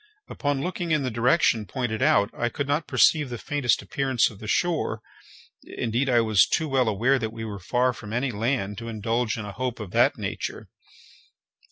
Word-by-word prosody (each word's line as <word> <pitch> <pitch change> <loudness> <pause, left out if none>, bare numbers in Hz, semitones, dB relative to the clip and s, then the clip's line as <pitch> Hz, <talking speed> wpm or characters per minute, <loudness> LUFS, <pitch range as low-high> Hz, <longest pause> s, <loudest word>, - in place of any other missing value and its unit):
Upon 145 -2 -2
looking 175 -1 -3
in 155 -3 +2
the 130 - -2
direction 115 -2 +2
pointed 120 -5 -3
out, 100 +2 +3
I 120 - -1
could 140 +4 -4
not 145 +3 0
perceive 150 -4 +3
the 120 - -5
faintest 140 0 0
appearance 130 -5 +1
of 100 - -14
the 110 - -8
shore—indeed, 120 -3 -3
I 120 -2 +4
was 110 -3 +4
too 160 - 0
well 130 -4 +2
aware 120 +6 +2
that 110 -2 -3
we 110 0 -6
were 105 -2 -6
far 125 +8 +1
from 110 -3 -10
any 125 +3 -1
land 110 -2 -2
to 115 - -7
indulge 115 +1 -1
in 110 - -5
a 100 - -6
hope 125 +4 -4
of 105 -4 -7
that - - +3
nature. - - -5
120 Hz, 190 wpm, -25 LUFS, 110-135 Hz, -, I